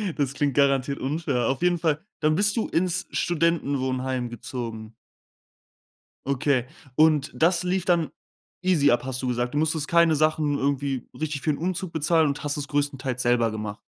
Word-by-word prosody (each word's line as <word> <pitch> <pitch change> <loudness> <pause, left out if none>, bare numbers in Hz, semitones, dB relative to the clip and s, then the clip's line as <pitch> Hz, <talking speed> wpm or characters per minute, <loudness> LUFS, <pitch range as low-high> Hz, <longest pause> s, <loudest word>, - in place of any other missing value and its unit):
Das 140 -3 -1
klingt 140 0 0
garantiert 140 0 +2
unfair. 135 -4 -1
Auf 135 +4 -1
jeden 180 0 +3
Fall 160 -3 0 0.2
dann 155 0 +2
bist 205 +4 +2
du 230 - 0
ins 180 +1 0
Studentenwohnheim 130 -7 0
gezogen? 115 -2 -7 1.3
Okay. 140 -2 +1 0.3
Und 155 -1 +3
das 170 +2 +2
lief 180 0 0
dann 170 -3 +2 0.5
easy 180 -6 +3
ab, 120 - +2
hast 130 0 -4
du 130 - -2
gesagt. 125 0 -1
Du - - -1
musstest 155 0 0
keine 170 -1 +4
Sachen 155 -1 +1
irgendwie 140 -2 -1
richtig 150 -3 -3
für 155 - -1
'n 145 - -3
Umzug 180 +1 -3
bezahlen 160 0 +2
und 140 0 -3
hast 145 -1 -1
es 145 -1 -4
größtenteils 135 -3 -1
selber 120 -2 +2
gemacht? 105 0 -5
145 Hz, 170 wpm, -25 LUFS, 130-160 Hz, 1.3 s, keine